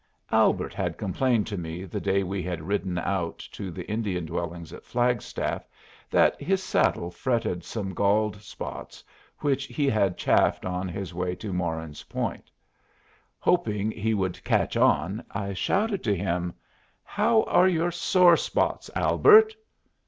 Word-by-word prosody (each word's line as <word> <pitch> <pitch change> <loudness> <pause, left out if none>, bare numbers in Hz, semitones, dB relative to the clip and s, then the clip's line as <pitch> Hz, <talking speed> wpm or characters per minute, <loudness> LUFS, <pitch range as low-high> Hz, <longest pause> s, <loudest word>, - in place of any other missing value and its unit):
Albert - - +2
had - - -3
complained 110 +3 +1
to 105 - -5
me 85 +2 -5
the 90 - -5
day 100 +1 +1
we 95 +1 -3
had 85 -2 -4
ridden 95 0 -2
out 85 -1 -2
to 100 -2 -8
the 90 0 -7
Indian 100 -5 -2
dwellings 85 0 -5
at - - -10
Flagstaff 120 -2 -1 0.4
that - - +3
his 190 +5 0
saddle 85 - +1
fretted 115 -4 -1
some 100 -2 -5
galled 100 +2 +1
spots 105 - -8 0.4
which 140 -1 0
he 145 -3 -1
had 100 -7 +1
chafed - - +2
on 90 +1 -2
his 95 +1 -5
trip 90 +1 -3
to 105 -4 -5
Moran's 80 -4 -3
Point. - - -4 0.9
Hoping 110 - +1
he 110 +1 -1
would 95 -3 -2
"catch - - +1
on," 95 +7 +2
I 100 -1 -4
shouted 200 - 0
to 100 -3 +1
him, 90 -1 -2 0.5
"How 220 +2 +2
are 180 - +4
your 175 -1 +1
sore 175 0 +5
spots, - - -1
Albert?" 435 +1 +6
100 Hz, 145 wpm, -26 LUFS, 90-125 Hz, 0.9 s, Albert